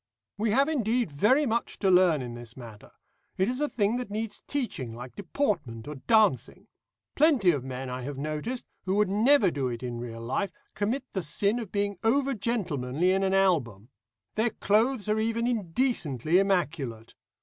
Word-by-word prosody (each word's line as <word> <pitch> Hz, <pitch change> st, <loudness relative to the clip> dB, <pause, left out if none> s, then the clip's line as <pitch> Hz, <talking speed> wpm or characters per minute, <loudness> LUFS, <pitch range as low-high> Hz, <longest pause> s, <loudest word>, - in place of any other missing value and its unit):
"We 220 Hz, +2 st, 0 dB
have 270 Hz, +6 st, +3 dB
indeed 240 Hz, -, 0 dB
very 250 Hz, -, +3 dB
much 235 Hz, -1 st, -1 dB
to 195 Hz, -2 st, +2 dB
learn 180 Hz, -6 st, +4 dB
in 120 Hz, -1 st, -6 dB
this 120 Hz, 0 st, -10 dB
matter. 115 Hz, -4 st, -11 dB, 0.5 s
It 190 Hz, -, +2 dB
is 250 Hz, +4 st, -2 dB
a 295 Hz, -, +1 dB
thing 215 Hz, +1 st, +1 dB
that 250 Hz, -4 st, -5 dB
needs 215 Hz, +1 st, -4 dB
teaching, 150 Hz, -, -3 dB
like 125 Hz, 0 st, -9 dB
deportment 175 Hz, -, -2 dB
or 150 Hz, -, -5 dB
dancing. 165 Hz, -, +2 dB, 0.5 s
Plenty 275 Hz, -, +4 dB
of 140 Hz, -6 st, -2 dB
men 130 Hz, 0 st, -5 dB
I 125 Hz, 0 st, -5 dB
have 140 Hz, +2 st, -5 dB
noticed, 155 Hz, -, -4 dB, 0.2 s
who 190 Hz, +1 st, 0 dB
would 210 Hz, -2 st, +3 dB
never 215 Hz, 0 st, +4 dB
do 140 Hz, -4 st, -1 dB
it 120 Hz, 0 st, -5 dB
in 120 Hz, -1 st, -4 dB
real 115 Hz, -1 st, -7 dB
life, 135 Hz, +12 st, -1 dB, 0.2 s
commit 235 Hz, +7 st, -1 dB
the 190 Hz, -, -1 dB
sin 200 Hz, +8 st, 0 dB
of 220 Hz, -5 st, -7 dB
being 200 Hz, -2 st, -1 dB
over 270 Hz, +4 st, +2 dB
gentlemanly 180 Hz, -, -1 dB
in 190 Hz, +1 st, +2 dB
an 195 Hz, 0 st, +1 dB
album. 130 Hz, -, +1 dB, 0.4 s
Their 220 Hz, +2 st, +1 dB
clothes 220 Hz, +2 st, +1 dB
are 215 Hz, +1 st, +1 dB
even 230 Hz, +1 st, 0 dB
indecently 180 Hz, -, +1 dB
immaculate. 150 Hz, -, -1 dB
195 Hz, 175 wpm, -28 LUFS, -, 0.5 s, learn